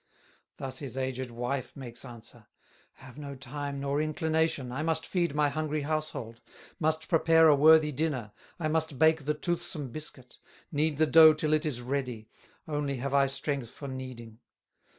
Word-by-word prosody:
Thus 135 -1 -4
his 135 -3 -6
aged 130 -1 -3
wife 125 +3 -4
makes 125 -4 -8
answer: 120 -3 -12 0.5
"Have 130 +2 -13
no 140 -1 -7
time, 140 +2 -5
nor 140 +1 0
inclination, 160 -3 0
I 135 +4 -3
must 160 0 0
feed 170 -5 -1
my 150 -1 +3
hungry 155 0 -2
household, 145 -6 -3 0.4
Must 155 0 0
prepare 165 0 +5
a 155 - +7
worthy 155 +1 +6
dinner, 135 -7 -2 0.3
I 160 - 0
must 155 -2 -1
bake 160 -1 +4
the 150 +1 0
toothsome 155 -5 -3
biscuit, 130 -3 -8 0.3
Knead 150 -1 0
the 155 - +4
dough 160 0 +8
till 155 0 0
it 155 +1 +2
is 125 -5 -2
ready, 125 -4 -3 0.4
Only 145 -2 -2
have 135 +2 -3
I 140 -1 +4
strength 135 -2 -2
for 140 - -9
kneading." 125 -4 -8
145 Hz, 165 wpm, -29 LUFS, 130-155 Hz, 0.5 s, dough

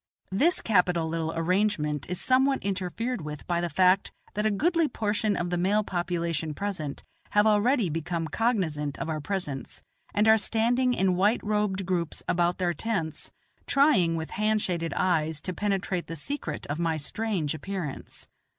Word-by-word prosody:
This 305 - +2
capital 180 -5 +2
little 160 0 -2
arrangement 165 -4 0
is 180 - -2
somewhat 265 +1 +3
interfered 200 +4 -2
with 150 -1 -7
by 170 -1 0
the 175 - -1
fact 185 +2 +3 0.2
that 210 +1 +1
a - - +3
goodly 330 - +2
proportion 215 -3 0
of 175 0 -2
the 175 - 0
male 205 +4 +2
population 170 -4 -2
present 180 -8 -4 0.3
have 210 0 +4
already 215 +2 +3
become 165 +1 -2
cognizant 160 - 0
of 165 - -4
our 155 -1 -2
presence, 150 -7 -4 0.3
and 210 +1 +2
are 220 0 +7
standing 245 +4 +2
in 185 -1 +2
white 205 +5 +2
robed 210 -2 0
groups 175 -3 -2
about 175 0 +2
their 175 -2 0
tents 170 -4 -2 0.4
trying 220 - +4
with 160 -1 -4
hand 215 +1 +1
shaded 170 -2 -2
eyes 160 -4 +1
to 185 - -4
penetrate 195 -3 -1
the 165 - -5
secret 280 - -4
of 145 +3 -4
my 165 -2 +1
strange 175 -1 -2
appearance. 170 -3 -6
185 Hz, 160 wpm, -27 LUFS, 165-215 Hz, 0.4 s, are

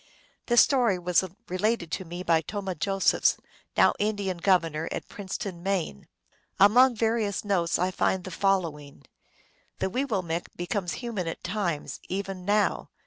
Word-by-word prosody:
This 240 -1 +7
story 245 -8 +2
was 180 +1 +2 0.2
related 185 -1 -1
to 190 - -3
me 175 +2 -6
by 165 -2 +3
Tomah 195 0 -4
Josephs, 195 +4 +2 0.4
now - - +6
Indian 205 -3 -1
governor 165 -3 +1
at - - -4
Princeton, 190 -2 -6
Maine. 185 - -2 0.5
Among 240 +6 +6
various 220 -3 0
notes 175 -4 +1
I 180 +2 0
find 185 0 0
the 185 - -7
following: 165 -7 -1 0.4
" - - -37
The 190 - -1
weewillmekq 190 -10 -1
becomes 175 0 -2
human 205 -8 -3
at 165 - -5
times, 175 -5 -2
even 190 -1 -4
now." 205 +1 +1
190 Hz, 140 wpm, -27 LUFS, 175-205 Hz, 0.5 s, This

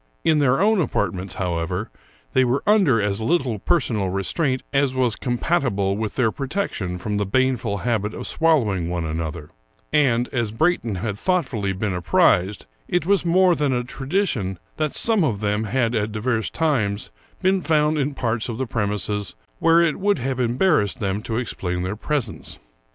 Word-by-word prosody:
In 155 -2 +3
their 135 -1 +3
own 210 0 +3
apartments, 95 - -2
how 90 -3 -1
ever, 90 +6 -3 0.4
they 130 - +4
were 130 +3 0
under 190 - +4
as 105 0 -1
little 130 -5 0
personal 110 - 0
restraint 130 - -1
as 140 -1 +2
was 125 -4 +1
compatible 120 - 0
with 110 0 -3
their 120 -4 +2
protection 135 - -3
from 105 +3 -3
the 105 - +1
baneful 125 -2 +1
habit 110 -2 -1
of - - -6
swallowing 110 - +1
one 85 -2 -2
another; 80 -1 -4 0.4
and, 125 -5 +3
as 120 -4 -1
Brayton 115 - 0
had 100 +1 -4
thoughtfully 135 - 0
been 95 +1 -2
apprised, 90 +2 +2 0.2
it 175 -3 0
was 200 0 +3
more 180 +1 +4
than 145 -4 0
a 125 0 0
tradition 135 - -2 0.2
that 155 -2 -1
some 220 -5 +3
of 115 -10 0
them 105 +1 0
had 115 +1 0
at 110 -1 -1
divers 110 +1 -1
times 115 -11 0 0.3
been 190 0 +3
found 155 -2 +2
in 140 0 -1
parts 115 -2 -1
of 115 - -4
the 130 - -1
premises 105 - -2 0.2
where 165 +1 +5
it 170 0 +1
would 205 0 +2
have 130 0 -3
embarrassed 125 - +2
them 100 -1 -1
to 110 0 -3
explain 90 -7 -3
their 95 +3 -3
presence. 120 -1 -3
120 Hz, 170 wpm, -22 LUFS, 100-150 Hz, 0.4 s, where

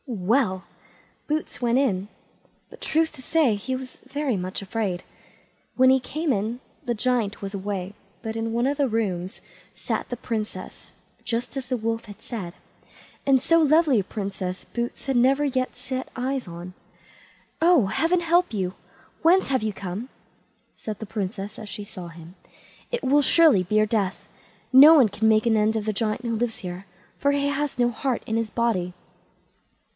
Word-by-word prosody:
Well! 205 -3 +1 0.6
Boots 305 -3 -3
went 240 0 +2
in, 205 -8 +1 0.6
but, - - -14
truth 320 0 +1
to 280 - -11
say, 295 -3 +3
he 235 +6 -3
was 255 0 -7
very 275 -1 -2
much 185 +1 -3
afraid. 195 -3 -2 0.7
When 260 0 +6
he 265 - +5
came 300 +3 -1
in 220 +4 -2 0.2
the 240 - -1
Giant 225 -3 0
was 195 0 -5
away, 195 -1 -4 0.3
but 220 -1 -4
in 225 0 -2
one 235 +2 +1
of 280 +1 0
the 285 -2 +2
rooms 195 -3 -2 0.3
sat - - -3
the 245 - -4
Princess, 220 -3 -5 0.3
just 245 +3 -3
as 265 -2 -4
the 255 -1 0
wolf 225 0 -2
had 205 -2 -12
said, 185 -7 -6 0.7
and 265 -2 +5
so 330 +4 +4
lovely 310 -4 +4
a - - 0
princess 190 -2 -4
Boots 240 0 -4
had 270 -1 0
never 270 +4 +4
yet 255 -2 -1
set 255 +1 -5
eyes 260 -1 -2
on. 175 +1 -8 0.9
"Oh! 335 - +5
heaven 330 - +1
help 345 -3 +2
you! 185 -2 -1 0.5
whence 360 +4 +5
have 260 -3 +2
you 215 0 -1
come?" 200 +5 -6 0.7
said 215 -2 -6
the 220 - -5
Princess, 200 0 -4
as 215 -2 -8
she 205 - -6
saw 185 -4 -9
him; 170 +1 -12 0.6
"it 485 0 -2
will 285 +3 +4
surely 295 - +5
be 195 +4 -2
your 215 0 +5
death. 205 -3 -1 0.5
No 290 +5 +10
one 260 -8 +6
can 220 +2 +1
make 215 0 +4
an 230 -1 +3
end 215 +1 +2
of 215 -2 -1
the 215 - 0
Giant 215 +1 -1
who 230 -1 -1
lives 230 0 -1
here, 180 +1 -7 0.3
for 280 - +3
he 285 0 +1
has 285 -1 -1
no 240 0 +3
heart 250 +1 -2
in 220 - -2
his 225 -1 0
body." 205 -7 0
230 Hz, 180 wpm, -25 LUFS, 200-270 Hz, 0.9 s, No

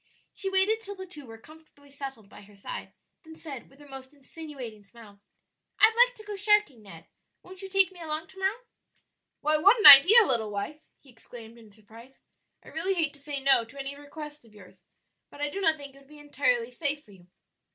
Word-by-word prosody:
She 390 - -2
waited 385 +4 0
till 405 -2 -8
the 380 -1 -9
two 300 -7 -12
were 225 0 -12
comfortably 295 +2 -20
settled 270 -6 -9
by - - -16
her 205 0 -19
side, 195 - -9 0.3
then 320 -2 -15
said, 285 -6 -10
with 275 - -23
her 290 - -16
most 270 +1 -12
insinuating 275 -6 -11
smile, 205 0 -18 0.6
"I'd 440 +1 +5
like - - -18
to 430 - -14
go 420 -1 -8
sharking, 410 - +1
Ned; 200 -2 -14 0.4
won't 370 +1 -14
you 385 - -9
take 385 -2 +2
me 355 -2 -14
along 315 0 -4
to 385 - -16
morrow?" 395 +5 -2 0.8
"Why, 305 +1 +1
what 400 +10 +4
an 425 - -1
idea, 365 +12 +10
little 230 - -2
wife!" 210 +10 -7
he 270 - -20
exclaimed 230 0 -14
in 220 -2 -18
surprise. 225 +5 -18 0.4
"I - - -13
really 370 +5 -3
hate 320 -4 -1
to 285 - -19
say 285 -1 -6
no 270 -3 +3
to 230 +5 -16
any 275 +1 -6
request 295 0 -11
of 220 -2 -22
yours, 185 -2 -18 0.5
but - - -16
I 290 0 -3
do 395 - -6
not 320 -4 +2
think 280 -2 -12
it 275 - -18
would 275 - -23
be 300 +1 -16
entirely 260 -5 -2
safe 290 +2 -2
for 210 - -20
you. 180 -3 -20
285 Hz, 215 wpm, -26 LUFS, 235-340 Hz, 0.8 s, idea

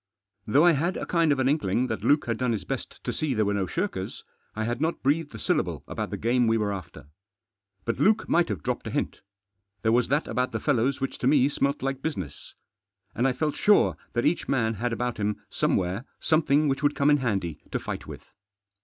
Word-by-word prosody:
Though 140 +10 +5
I 175 - +7
had 170 +5 0
a - - -4
kind 165 -3 +2
of 140 - +2
an 130 0 +2
inkling 125 -5 +1
that - - -4
Luke 145 +1 +3
had 115 -2 -2
done 125 -2 +1
his 105 -4 -3
best - - -6
to - - -2
see 150 -5 -1
there 110 -1 +2
were 100 - +1
no 100 -2 0
shirkers, 170 - -3 0.3
I 110 - -2
had 120 +3 -2
not 165 +2 -1
breathed 145 -1 +1
a - - -5
syllable - - -1
about - - -4
the - - -4
game 120 +1 +2
we 115 0 +3
were 105 -2 0
after. 95 -5 -8 0.8
But 115 - -2
Luke 215 +2 +3
might 170 -4 +3
have 95 -8 -3
dropped - - -2
a - - -2
hint. - - -2 0.6
There 110 - +3
was 120 +1 +3
that 145 +4 +1
about 125 0 -1
the - - -1
fellows 135 -1 +1
which 135 - -3
to 125 - 0
me 135 -2 +5
smelt 140 -1 -1
like 135 0 -2
business. 135 - -5 0.6
And 120 +4 +1
I 130 - +1
felt 150 +3 -1
sure 210 -1 +4 0.2
that 120 - 0
each 160 +4 +1
man 115 -4 +1
had 120 +3 -2
about 120 +1 -2
him 105 0 -1
somewhere 95 +7 0
something 155 -2 +3
which 135 0 0
would 145 -1 +2
come 140 +1 +3
in 145 - +5
handy 95 - -2
to - - -1
fight - - -6
with. - - -9
130 Hz, 225 wpm, -26 LUFS, 110-145 Hz, 0.8 s, I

